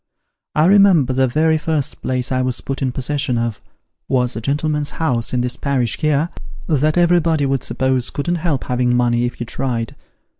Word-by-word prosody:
I 155 - +4
remember 185 -8 +5
the 130 0 +2
very 155 +4 +2
first 155 -4 -2
place 130 -1 -2
I 130 0 +1
was 130 -1 -1
put 135 0 -5
in 130 -2 0
possession 130 -1 -2
of, 115 -2 -2 0.5
was 125 -1 0
a 110 - -4
gentleman's 150 +3 -1
house 125 -8 0
in 125 - 0
this 125 0 -2
parish 130 -5 -1
here, 155 +1 +1 0.4
that 155 +1 +1
everybody 170 -4 +3
would 135 -2 0
suppose 130 -2 0
couldn't 175 +5 -2
help 155 -5 -1
having 125 -1 0
money 120 0 +2
if 120 - -3
he 120 - -5
tried. 115 -1 -3
135 Hz, 180 wpm, -19 LUFS, 125-155 Hz, 0.5 s, remember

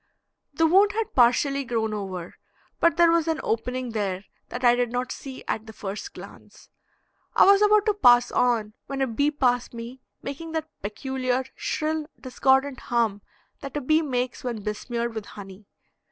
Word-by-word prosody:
The 325 - +3
wound 390 +5 +5
had 445 -1 -2
partially 275 +3 +3
grown 225 -3 -1
over, 185 -4 -5 0.5
but 335 0 +3
there 340 -1 +6
was 335 -1 +2
an 320 -1 0
opening 250 +2 -2
there 200 -3 -2 0.2
that 245 - -6
I 240 -1 +6
did 245 -1 0
not 245 +1 -2
see 265 -2 -8
at 220 0 -3
the 220 - -9
first 210 - -6
glance. - - -13 0.7
I - - +7
was 395 +1 +6
about 420 0 +5
to 425 - +3
pass 245 -11 +5
on 230 -4 +1
when 270 -1 -2
a - - +3
bee 275 +4 +1
passed 245 -5 0
me 235 +3 -8 0.2
making 320 +4 -6
that 315 -1 -3
peculiar 255 +4 -2
shrill, 310 0 -2
discordant 265 +1 +1
hum 225 -4 0 0.4
that 275 +1 -6
a - - -2
bee 310 +4 +3
makes 255 -4 -2
when 235 -4 -4
besmeared 235 +3 -3
with 220 -2 -5
honey. 195 0 -11
250 Hz, 170 wpm, -25 LUFS, 225-300 Hz, 0.7 s, I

